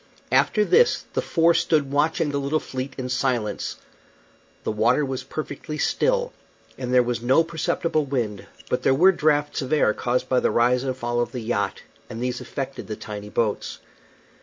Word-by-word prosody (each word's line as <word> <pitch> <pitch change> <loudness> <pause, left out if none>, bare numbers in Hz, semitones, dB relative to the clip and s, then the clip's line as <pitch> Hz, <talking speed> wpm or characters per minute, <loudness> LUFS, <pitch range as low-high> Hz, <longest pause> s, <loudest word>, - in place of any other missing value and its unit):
After 210 -2 +3
this 480 - +4
the - - 0
four 165 0 +3
stood 150 -4 +1
watching 150 +1 +1
the 140 - -1
little 140 +3 0
fleet 130 -1 -6
in 130 -1 -3
silence. 125 -4 -1 0.9
The - - -1
water 115 +7 +2
was 130 -1 -3
perfectly 150 +2 -6
still, - - +1 0.4
and 125 -1 -5
there 125 -1 +5
was 120 -1 -2
no 130 +7 +4
perceptible 165 -1 -1
wind, 115 -7 -3 0.2
but 125 - -1
there 135 - +3
were 180 +7 +6
draughts 150 -4 +1
of 130 +1 -5
air 150 -8 +3
caused 125 +1 -1
by 130 - +2
the - - +1
rise 125 +2 +2
and 130 -1 -2
fall 120 -1 -1
of 120 - -1
the 125 - -3
yacht, 110 -3 -2 0.3
and 115 - -6
these 125 0 -2
affected 135 -1 -5
the 110 - -4
tiny 105 -1 -7
boats. 110 -1 -1
130 Hz, 180 wpm, -24 LUFS, 120-150 Hz, 0.9 s, were